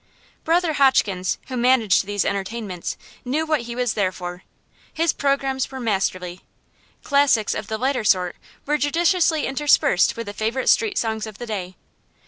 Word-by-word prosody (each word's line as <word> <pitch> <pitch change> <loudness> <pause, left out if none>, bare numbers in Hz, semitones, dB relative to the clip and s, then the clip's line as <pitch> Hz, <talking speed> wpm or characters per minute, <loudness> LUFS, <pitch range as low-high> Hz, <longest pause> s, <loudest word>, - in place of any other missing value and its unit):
Brother 335 0 +2
Hotchkins, 205 -10 +2
who 260 - -5
managed 235 -6 +3
these 205 -1 -1
entertainments, 200 -2 -4 0.3
knew 290 +6 -1
what 310 -3 +1
he 235 0 -7
was 245 -2 0
there 195 -3 0
for. 180 -1 -7 0.5
His 330 +1 +1
programmes 275 -2 0
were 265 - -7
masterly. 185 -5 -2 0.6
Classics 280 -7 +3
of 215 -1 -5
the 220 - -3
lighter 260 0 0
sort 180 -4 +2 0.3
were 300 +1 0
judiciously 330 +1 +2
interspersed 270 -9 +3
with 230 - -4
the 205 - -6
favorite 225 +5 -1
street 425 -3 +2
songs 220 -1 -1
of 215 -2 -10
the 240 - -6
day. 190 -5 -5
235 Hz, 155 wpm, -22 LUFS, 200-280 Hz, 0.6 s, managed